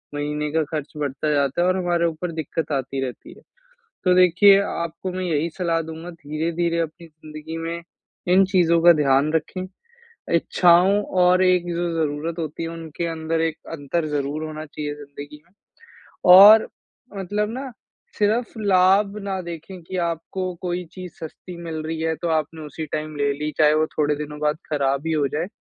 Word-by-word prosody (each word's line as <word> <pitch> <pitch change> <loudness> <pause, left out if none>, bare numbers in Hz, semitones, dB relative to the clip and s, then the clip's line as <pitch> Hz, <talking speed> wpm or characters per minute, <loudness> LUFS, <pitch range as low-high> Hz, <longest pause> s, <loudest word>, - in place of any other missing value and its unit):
महीने 150 +1 -2
का 160 +1 +1
खर्च 150 -2 -4
बढ़ता 145 +1 -2
जाता 140 +3 +1
है 180 - +3
और 185 0 +2
हमारे 175 -2 +1
ऊपर 170 +2 -4
दिक्कत 160 -1 -4
आती 135 -1 -2
रहती 125 - -9
है। - - -17 0.6
तो 180 -1 +4
देखिए, 185 +3 +6
आपको 170 +1 -4
मैं 185 0 -3
यही 165 -1 0
सलाह 170 -2 0
दूँगा 160 +2 -8
धीरे-धीरे 165 +2 -2
अपनी 165 +1 -5
ज़िंदगी 155 0 -9
में 165 +1 -4 0.5
इन 195 +1 +6
चीज़ों 170 -3 +4
का 175 0 +9
ध्यान 140 +2 +3
रखें, 185 +3 -2 0.7
इच्छाओं 180 +4 +4 0.2
और 180 +1 +4
एक 180 -1 +3
जो 175 0 -1
ज़रूरत 160 +1 -2
होती 160 0 -4
है 165 - -3
उनके 165 0 -5
अंदर 160 0 -2
एक 165 -1 -1 0.2
अंतर 155 +2 -2
ज़रूर 145 +1 -2
होना 155 0 -6
चाहिए 150 0 -5
ज़िंदगी 145 0 -11
में। 175 - -31 0.8
और 210 +4 +9 0.5
मतलब 205 +3 -2
ना 265 +2 -5 0.5
सिर्फ़ 220 +3 +1
लाभ 195 0 +3
ना 195 -1 -2
देखें 175 +2 -8
कि 185 +3 -7
आपको 180 +2 -4
कोई 180 0 -2
चीज़ 185 -2 -9
सस्ती 170 +3 -9
मिल 165 -1 -6
रही 160 0 -4
है, 160 0 0
तो 170 +3 -4
आपने 160 0 -1
उसी 155 +2 -6
टाइम 155 0 -5
ले 145 0 +1
ली, 150 +2 -3
चाहे 150 -1 +5
वो 155 0 +2
थोड़े 150 0 +2
दिनों 150 0 -6
बाद 150 0 +1
खराब 140 0 0
ही 160 - 0
हो 150 -2 +1
जाए। 155 +5 -2
165 Hz, 175 wpm, -22 LUFS, 150-180 Hz, 0.8 s, का